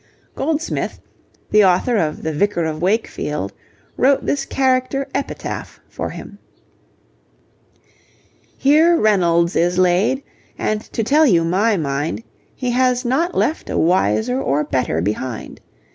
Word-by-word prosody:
Goldsmith, 320 +2 -2 0.5
the 210 0 +6
author 190 +6 +3
of 155 -5 -1
the 160 - -2
Vicar 175 +1 0
of 155 0 -4
Wakefield, 175 - -1 0.4
wrote 275 +1 +3
this 280 -1 -1
character 265 0 0
'epitaph' - - -5
for - - -4
him: - - -10 2.2
Here 315 +5 +4
Reynolds 175 - +2
is 175 +1 +1
laid, 185 +9 +2 0.3
and 215 0 -1
to 225 - -1
tell 300 +7 +4
you 170 -8 +4
my 200 +6 +2
mind, 145 +6 -2 0.3
He 250 -2 -2
has 250 0 +1
not 320 +9 0
left 315 - 0
a - - -2
wiser 125 - +1
or 140 +2 0
better 130 - -1
behind. 110 +5 -4
195 Hz, 125 wpm, -19 LUFS, 155-260 Hz, 2.2 s, the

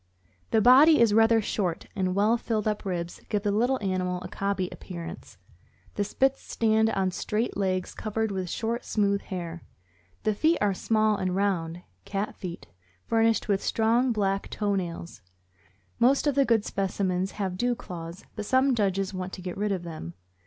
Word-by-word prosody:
The 220 - +3
body 275 +7 +7
is 230 -3 +5
rather 225 0 +5
short, 180 -5 -2
and 185 -2 0
well 210 +3 +3
filled 220 -2 -2
up 210 -1 -2
ribs 175 -2 -4
give 210 -2 0
the 205 - +1
little 245 +6 +2
animal 185 -1 -1
a - - -5
cobby 195 -2 -2
appearance. 170 - -8 0.6
The 205 - 0
Spits 270 +6 +1
stands 220 -1 +2
on 190 -1 +1
straight 215 +5 -2
legs 185 -2 -1
covered 220 0 -2
with 185 -2 -3
short, 235 +5 -2
smooth 200 -2 +1
hair. 170 -3 -6 0.6
The 215 - +2
feet 320 +10 +2
are 205 -1 +2
small 215 +2 +1
and 185 -1 -1
round 175 -4 -1 0.2
(cat 200 - -3
feet), 175 -2 -7 0.4
furnished 225 0 +2
with 200 -2 +1
strong 235 +3 +2
black 195 -3 0
toe 205 -1 -1
nails. 170 - -4 0.8
Most 265 +5 +4
of 290 - +3
the 275 0 +3
good 230 -3 +2
specimens 190 -1 -1
have 190 -3 -3
dew 245 +5 0
claws, 170 -2 -8
but 210 -1 -5
some 260 +1 +3
judges 195 -3 0
want 185 0 -5
to 185 - -7
get 180 -1 -4
rid 210 +1 -1
of 185 -3 -2
them. 155 - -7
200 Hz, 175 wpm, -27 LUFS, 185-225 Hz, 0.8 s, body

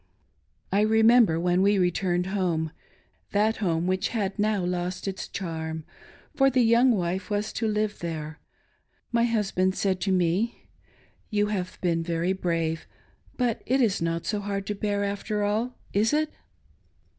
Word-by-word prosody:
I 200 - +3
remember 220 -4 +5
when 175 +1 +2
we 200 +1 +4
returned 180 0 +1
home 175 -5 -1 0.3
— 90 +4 -40
that 215 +2 +2
home 170 -5 0
which 185 +3 +1
had 205 -3 -2
now 210 -3 +1
lost 180 +1 -3
its 190 -1 -4
charm, 160 -3 -4 0.5
for 270 -2 +5
the 255 -2 +3
young 235 +3 +5
wife 185 0 -2
was 205 0 -1
to 225 - -1
live 210 -1 -1
there 160 -2 -5 0.4
— - - -41 0.3
my 235 0 +3
husband 195 -5 +1
said 190 -2 0
to 190 - 0
me: 185 +5 0 0.3
" - - -33 0.3
You 210 -1 +1
have 185 -2 -3
been 170 -2 +1
very 170 +2 0
brave, 165 -3 -2 0.5
but 245 -3 0
it 265 +3 +2
is 215 -8 +2
not 165 0 -1
so 210 - -1
hard 200 -1 -3
to 210 - -2
bear, 205 0 -1
after 205 +1 -2
all, 220 +5 -1 0.2
is 215 +6 +2
it.'" 305 0 +1
195 Hz, 165 wpm, -26 LUFS, 175-215 Hz, 0.5 s, remember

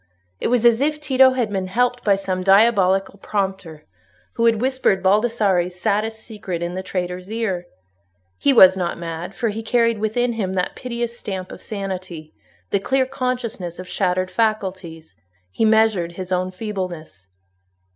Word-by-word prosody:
It - - -1
was 240 0 +2
as 235 +1 +5
if 300 +1 0
Tito 265 -3 +4
had 240 -5 -1
been 190 -2 -2
helped 245 +5 0
by 200 -2 +4
some 190 -1 -3
diabolical 195 -1 +3
prompter, 190 -7 -3 0.5
who 230 0 +2
had 225 -2 +3
whispered 255 -6 +1
Baldassarre's 195 -4 +2
saddest 220 +3 -1
secret 200 -7 -6
in 170 +1 -3
the 185 - -3
traitor's 180 +1 -4
ear. 195 -6 -2 0.7
He 285 - +3
was 190 -7 +8
not 180 -2 -2
mad; 170 +3 -6
for 235 - -1
he 215 +2 -4
carried 230 -1 +1
within 235 +3 0
him 195 -5 -2
that 180 -1 -2
piteous 235 -1 -4
stamp 185 -2 -5
of - - -10
sanity, 185 -6 -6 0.4
the 200 - +2
clear 265 +6 +1
consciousness 245 -9 -4
of 185 - -8
shattered 185 -1 -1
faculties; 190 -7 -2 0.4
he 220 - 0
measured 215 -6 +3
his 185 +1 -7
own 185 0 0
feebleness. 180 - -6
195 Hz, 155 wpm, -21 LUFS, 185-230 Hz, 0.7 s, was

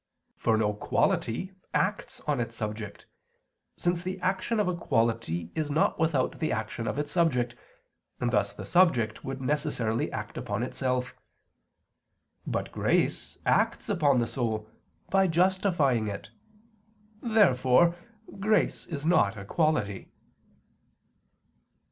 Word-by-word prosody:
For 110 - +1
no 105 -1 +1
quality 115 - 0 0.2
acts 195 +2 -1
on 150 -3 -1
its 115 -1 -3
subject, 105 -1 -5 0.7
since 175 0 0
the 185 +1 -4
action 190 +5 0
of 205 - +2
a 180 - 0
quality 115 - 0
is 155 -2 -2
not 150 +2 +1
without 155 -5 +1
the 155 - 0
action 110 +1 -3
of - - -2
its 145 0 -2
subject, 125 -8 +1 0.6
and 125 -1 0
thus 100 -3 +2
the - - -8
subject 130 -12 +3
would 135 0 -5
necessarily 130 -6 0
act - - -5
upon 105 +3 -2
itself. 125 0 -1 1.3
But - - -2
grace - - 0
acts - - +1
upon 145 -5 +3
the 120 - +2
soul, 110 -4 -2 0.4
by 195 0 +4
justifying 170 - +2
it. 100 -1 -6 0.9
Therefore 170 - +4 0.4
grace 215 +2 +1
is 150 -3 -5
not 110 - +3
a 100 - -7
quality. 130 - 0
135 Hz, 125 wpm, -28 LUFS, 115-170 Hz, 1.3 s, by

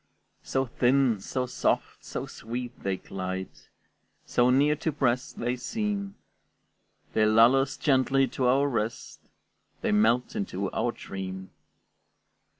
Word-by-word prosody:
So 135 0 -1
thin, 125 -2 +2
so 125 +6 -2
soft, 125 - -1
so - - -5
sweet, 120 +2 -6
they 95 -1 -1
glide, 95 0 -5 0.7
So 120 0 +3
near 145 +4 +4
to 160 - -1
press 130 -3 0
they 120 +1 -2
seem, 200 - -3 1.0
They 110 -1 +3
lull 115 +4 +6
us 135 +1 0
gently 135 -1 +3
to 130 0 0
our 135 +3 +4
rest, 115 -4 -3 0.6
They - - 0
melt 110 +4 +2
into 100 -1 -3
our - - 0
dream. 95 0 -7
125 Hz, 125 wpm, -27 LUFS, 105-135 Hz, 1.0 s, lull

